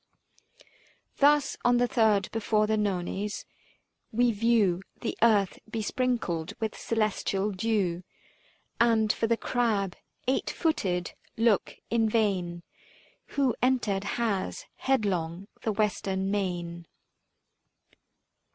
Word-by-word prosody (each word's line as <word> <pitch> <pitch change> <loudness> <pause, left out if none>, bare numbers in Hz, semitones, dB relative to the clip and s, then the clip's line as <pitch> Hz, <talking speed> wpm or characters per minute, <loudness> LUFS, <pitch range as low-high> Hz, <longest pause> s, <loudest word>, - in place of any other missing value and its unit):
Thus, 290 -1 +4
on 245 0 +4
the 245 - +3
third 215 -5 +2
before 215 -1 +1
the 220 +1 +1
Nones, 205 0 -2 0.7
we 240 +2 +3
view 210 -5 +2 0.2
335 - - -17
The - - -2
earth 210 -4 +3
besprinkled 220 -6 -1
with 220 -2 -2
celestial 210 -2 0
dew, 195 -4 0 0.8
And 225 -2 +4
for 225 - 0
the 230 0 +2
Crab, 215 -8 0 0.3
eight 260 - +1
footed, 185 - -1 0.2
look 225 -3 +2 0.2
in 225 -1 +3
vain; 185 -6 0 0.7
Who 265 -5 +3
entered 225 -6 +1
has, 220 -5 -1
headlong 195 -8 0
the 220 - 0
Western 195 -2 0
main. 175 -4 -3
210 Hz, 105 wpm, -28 LUFS, 190-230 Hz, 0.8 s, Thus